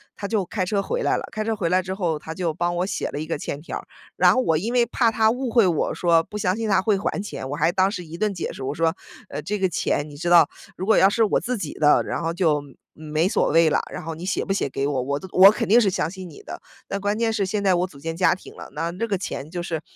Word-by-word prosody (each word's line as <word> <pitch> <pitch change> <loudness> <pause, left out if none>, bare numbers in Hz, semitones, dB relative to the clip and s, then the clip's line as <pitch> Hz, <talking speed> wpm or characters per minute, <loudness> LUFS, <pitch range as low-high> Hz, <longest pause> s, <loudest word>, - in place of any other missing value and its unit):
他 200 - -5
就 210 -4 0
开 185 +1 -2
车 200 +1 0
回 - - -2
来 - - +1
了， - - -4
开 215 -1 -3
车 225 0 -1
回 190 -5 -1
来 185 +2 +3
之 185 +1 -5
后， 175 -5 -1
他 160 +2 -7
就 170 -2 -2
帮 175 +1 -1
我 180 - +1
写 195 - -3
了 - - -5
一 155 - -4
个 165 - -2
欠 145 - -5
条 165 - -5
儿。 - - -15 0.3
然 - - +5
后 255 - +2
我 160 -10 +2
因 215 +9 -2
为 245 -1 +3
怕 235 -1 +1
他 220 0 +3
误 250 0 -3
会 225 -4 +5
我 165 -4 0
说 170 -2 +3
不 210 - -8
相 185 -2 0
信 225 -1 -3
他 195 -2 +3
会 210 -1 +2
还 195 0 -2
钱， 135 -9 -6
我 145 - -3
还 165 +3 +2
当 190 +1 +2
时 180 -4 -6
一 160 +2 -9
顿 210 +1 0
解 175 - -4
释， - - -8
我 135 +2 -2
说： 165 +2 +1 0.3
“呃， - - -5
这 200 +7 -3
个 190 - +2
钱 150 -3 -1
你 145 - -11
知 170 +4 -3
道， 175 -1 +7 0.3
如 185 - -4
果 220 - +4
要 190 - +6
是 230 +2 +2
我 205 - +1
自 250 0 -2
己 160 -8 -5
的， 150 -1 +4
然 - - -3
后 165 0 -1
就 160 -5 +1
没 140 -2 -15 0.2
没 155 +2 -1
所 - - +1
谓 165 +1 +5
了。 - - +2
然 - - -6
后 165 +1 -4
你 165 - -9
写 190 - -1
不 195 - 0
写 195 -8 -1
给 135 +1 -2
我， 135 -3 -1
我 140 +3 -2
都 190 - -9
我 190 +2 +9
肯 - - -3
定 235 +4 +6
是 200 - +3
相 165 -3 -1
信 185 -1 -8
你 155 - -13
的。 - - -8 0.3
但 200 - -3
关 205 +1 0
键 225 -1 +1
是 205 -3 0
现 200 +2 -2
在 190 -2 +4
我 180 +1 0
组 180 - -16
建 165 +2 -4
家 180 0 +3
庭 185 - -13
了， - - -10
那 165 +2 -2
这 230 +6 -3
个 200 -3 0
钱 160 -5 -5
就 175 0 -4
是 165 -2 -3
185 Hz, 335 characters per minute, -23 LUFS, 160-205 Hz, 0.3 s, 我